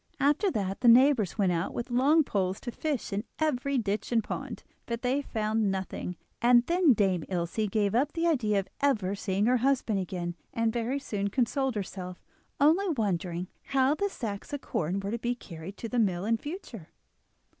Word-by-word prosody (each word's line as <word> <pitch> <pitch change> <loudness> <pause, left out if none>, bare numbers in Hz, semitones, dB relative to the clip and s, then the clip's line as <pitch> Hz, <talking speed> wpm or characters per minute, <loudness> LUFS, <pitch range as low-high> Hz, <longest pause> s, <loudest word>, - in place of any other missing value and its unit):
After 295 +8 +3
that 195 - -2
the 245 - +3
neighbours 240 -5 +5
went 195 -4 +3
out 170 +1 -2
with 240 +1 -4
long 285 +6 +4
poles 190 -6 -1
to 240 - -5
fish 280 -4 -3
in 205 +2 -1
every 280 -3 0
ditch 210 -1 -2
and 230 -2 +3
pond, - - -5 0.2
but 235 +1 -3
they 260 +3 +1
found 220 -4 0
nothing, 190 -2 -4 0.2
and 240 0 +5
then 345 -5 +4
Dame 190 -6 +1
Ilse 180 +4 -1
gave 205 -1 +1
up 270 +6 +1
the 335 0 -1
idea 230 -11 +2
of 195 - -4
ever 215 -9 +1
seeing 200 0 -1
her 250 +2 +4
husband 245 -5 +1
again 175 -2 -3 0.2
and 230 -1 +1
very 240 +3 -1
soon 205 -7 -2
consoled 260 +3 0
herself, 185 -2 -5 0.4
only 330 +7 +4
wondering 185 - -1 0.2
how 270 +1 +3
the 405 +7 -1
sacks 210 - -5
of 290 -1 -4
corn 175 +4 -2
were 200 +1 -3
to 235 - -2
be 240 +2 -1
carried 175 -3 -9
to 230 - -5
the 240 +2 -1
mill 190 -4 +1
in 230 +1 +2
future. 260 - -8
225 Hz, 185 wpm, -29 LUFS, 195-270 Hz, 0.4 s, neighbours